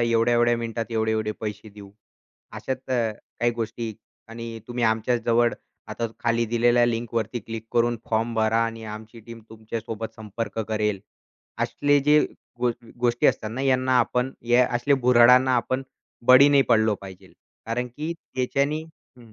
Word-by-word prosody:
एवढ्या-एवढ्या 120 +1 +3
मिनिटात 115 0 -4
एवढे-एवढे 110 -1 0
पैसे 105 0 -6
देऊ. 100 -1 -13 0.7
अशाच 130 -1 -3
अ, 130 - 0 0.5
काही 120 0 +3
गोष्टी 115 0 -4 0.4
आणि 115 0 -7
तुम्ही 120 -1 -1
आमच्या 110 +2 +1
जवळ 120 0 +3 0.4
आता 115 - -3
खाली 115 0 +1
दिलेल्या 120 +1 +4
लिंकवरती 115 0 -2
क्लिक 115 +1 -7
करून 120 0 +2
फॉर्म 115 +1 0
भरा 110 0 +2
आणि 115 -1 -7
आमची 110 +2 -11
टीम 115 -1 -10
तुमच्यासोबत 110 0 -6
संपर्क 110 0 -6
करेल." 105 -2 -1 0.6
असले 145 0 +2
जे 150 0 +7 0.4
गो 125 -1 +2 0.3
गोष्टी 120 -1 +2
असतात 110 - +1
ना, 120 +4 -5
यांना 130 -1 +2
आपण 125 +2 0 0.2
या 125 +1 +6
असले 140 +4 +2
भुर्हाडांना 125 +1 +6
आपण 130 +2 -1 0.4
बळी 130 +3 +8
नाही 140 -1 +5
पडलो 110 -2 +4
पाहिजे 95 -2 -12 0.3
कारण 120 +2 -2
की 150 +7 -5 0.2
त्याच्यानी 140 +4 0
हं, 125 -8 -20
115 Hz, 145 wpm, -24 LUFS, 110-125 Hz, 0.7 s, बळी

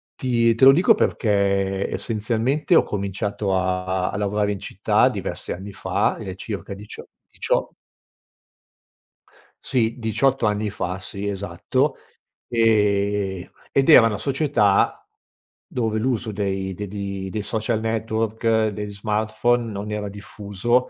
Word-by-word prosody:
ti 115 -3 +2
te 130 - +5
lo 135 - +11
dico 175 +6 +5
perché 100 -2 +1
essenzialmente 120 - 0
ho - - +6
cominciato 100 0 -2
a 90 0 0
a - - -4
a - - -4
lavorare 105 0 0
in 100 - -4
città - - +2
diversi - - -5
anni 95 +3 -8
fa, - - 0
ehm, 95 -1 -6
circa 100 0 -6
dicio 100 +2 -10 0.2
dicio - - -1 1.9
Sì, 115 -3 0
18 120 +3 +1
anni 105 0 0
fa, 90 -2 -4
sì, 100 +1 -6
esatto, 100 0 -1 0.5
ehm, 100 -4 +1 0.2
ed 135 +2 +2
era 125 -7 +9
una 105 -2 -2
società 130 -5 +1 0.6
dove 110 -3 -1
l’uso 120 -1 -1
dei 95 -2 -2
de 105 +2 -5
di 100 -1 -5
dei 105 +2 -3
social 110 +2 -1
network, 110 0 0
degli 105 0 -5
smartphone, 110 +3 0
non 105 +1 -5
era 105 -1 -3
diffuso, 105 +4 -1
105 Hz, 130 wpm, -23 LUFS, 100-115 Hz, 1.9 s, lo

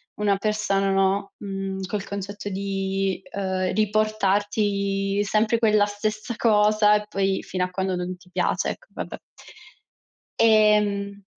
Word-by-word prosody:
una 205 -1 +1
persona. 200 -2 0
no, 195 +1 +1
mhmm, 195 -1 -5
col 200 +1 -3
concetto 200 +1 -5
di, 195 0 -2
uhm, 190 -2 -1
riportarti 205 -1 +1
sempre 215 +3 +1
quella 215 -2 +4
stessa 215 +2 -3
cosa 210 -1 +4
e 210 0 -1
poi, 195 -1 0
fino 185 -1 -2
a - - -7
quando 190 0 -1
non 180 +1 -4
ti 180 0 -21
piace, - - 0
ecco, - - -11
vabbè. - - -6 1.2
Ehm 210 -2 +3
200 Hz, 125 wpm, -24 LUFS, 195-210 Hz, 1.2 s, quella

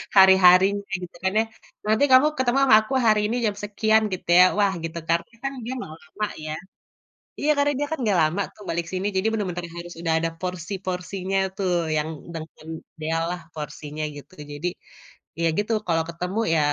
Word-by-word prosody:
hari-harinya 190 +1 +7 0.2
gitu 175 - -9
kan 190 - +2
ya. - - +4 0.4
Nanti 220 +6 +3
kamu 260 +3 +7
ketemu 260 0 +1
sama 260 - +8
aku 240 +5 -6
hari 215 -1 +5
ini - - 0
jam 210 - 0
sekian 220 +1 +2
gitu 185 - -6
ya. 180 - +9
Wah, 200 -2 +3
gitu 165 +1 -5
karena 170 +6 0
kan 275 - -1
dia 255 - -3
nggak 155 - -7
lama 210 +7 -4 0.2
ya. 155 - -3 0.9
Iya 300 - +2
karena 285 0 +3
dia 290 - 0
kan 320 - -1
nggak 200 -5 +2
lama 155 +6 +1
tuh 210 - -14
balik 170 0 -2
sini, 185 +2 -2
jadi 190 +3 +1
bener-bener 180 -5 -2
harus 175 0 -7
udah 165 -1 0
ada 165 - 0
porsi-porsinya 185 +1 -3 0.2
tuh, 190 -2 -1 0.3
yang 150 +1 0 0.3
dengan 160 -1 -9 0.3
ideal 160 +1 -2
lah 180 0 -4
porsinya 150 0 -6
gitu. 145 +6 -12 0.2
Jadi 145 +5 -3 0.7
ya 165 - +3
gitu, 210 +2 -1 0.2
kalau 165 -1 +2
ketemu 180 +5 -3
ya 160 - +3
185 Hz, 185 wpm, -24 LUFS, 165-210 Hz, 0.9 s, ya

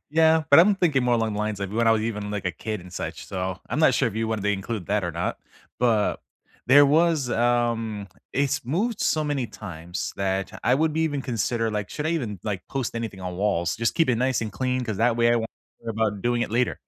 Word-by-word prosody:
Yeah, 160 0 +4
but 140 - +9
I'm 200 +3 +5
thinking 150 -9 +2
more 120 -1 +3
along 110 -2 0
the - - -3
lines 105 -1 -2
like 100 -1 -3
when 115 +2 +1
I 115 - +6
was 110 -1 +1
even 105 -2 -3
like 100 -2 -4
a 90 - +1
kid 110 +1 -5
and 90 0 -13
such - - -5
so, 95 0 -3
I'm 125 - -2
not 160 - +5
sure 125 - +2
if 110 - -9
you 110 0 -1
wanted 110 -3 -2
to 105 - 0
include 100 -1 -3
that 105 -2 0
or 85 - -3
not, - - -2 0.4
but 115 -4 +2 0.5
there 140 +2 +7
was, 155 -3 +2
um 115 -3 0 0.3
it's 140 -1 0
moved 195 - -1
so 155 -1 +1
many 140 -5 -1
times 85 0 -6
that 95 0 -1
I 125 - +4
would 155 +2 +1
be 160 - -1
even 145 -3 -1
consider 115 -2 -1
like, 105 -3 -3
should 150 +1 -3
I - - +1
even 115 - -2
like 100 -4 -3
post 130 -4 -3
anything 115 -5 -5
on 90 -1 -5
walls? 90 -4 0
Just 115 0 0
keep 165 -5 +2
it 120 - +3
nice 130 +1 +1
and 110 -3 -4
clean 130 +4 -1
'cause 110 -4 -3
that 120 0 +3
way 120 0 +4
I - - +3
won't 115 -1 -2 0.3
worry 115 -1 -5
about 105 -3 -1
doing 120 0 +1
it - - -3
later 120 +2 0
115 Hz, 250 wpm, -25 LUFS, 105-130 Hz, 0.5 s, but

